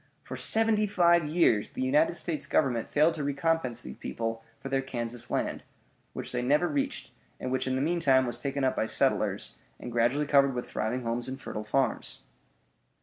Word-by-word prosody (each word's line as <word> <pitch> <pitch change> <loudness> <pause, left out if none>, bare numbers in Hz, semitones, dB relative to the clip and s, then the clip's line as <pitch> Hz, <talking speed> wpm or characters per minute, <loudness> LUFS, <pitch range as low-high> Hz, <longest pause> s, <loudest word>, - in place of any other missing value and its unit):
For - - -7
seventy 220 -1 +2
five 170 -5 +4
years 150 -10 +2
the 260 - -4
United 300 +5 +3
States 155 -5 -2
Government 125 -6 +1
failed 155 +3 +3
to 155 -3 -4
recompense 140 -4 0
these - - -8
people 115 0 -4 0.2
for - - -7
their 135 0 0
Kansas 120 -2 -4
land, - - -1 0.5
which - - -5
they 125 - -1
never 150 +8 +2
reached, 275 +3 -2 0.3
and 130 - -4
which 130 0 -1
in 130 - 0
the 130 - 0
meantime 145 -5 +3
was 120 -1 -3
taken 140 0 -2
up 130 - +2
by 110 - 0
settlers, - - 0 0.2
and 120 - -7
gradually 120 +5 +2
covered 140 -2 +4
with 125 - -4
thriving 120 +4 -2
homes 120 +1 -2
and 130 +1 -5
fertile 105 - -5
farms. 130 +6 -1
135 Hz, 185 wpm, -29 LUFS, 120-165 Hz, 0.5 s, five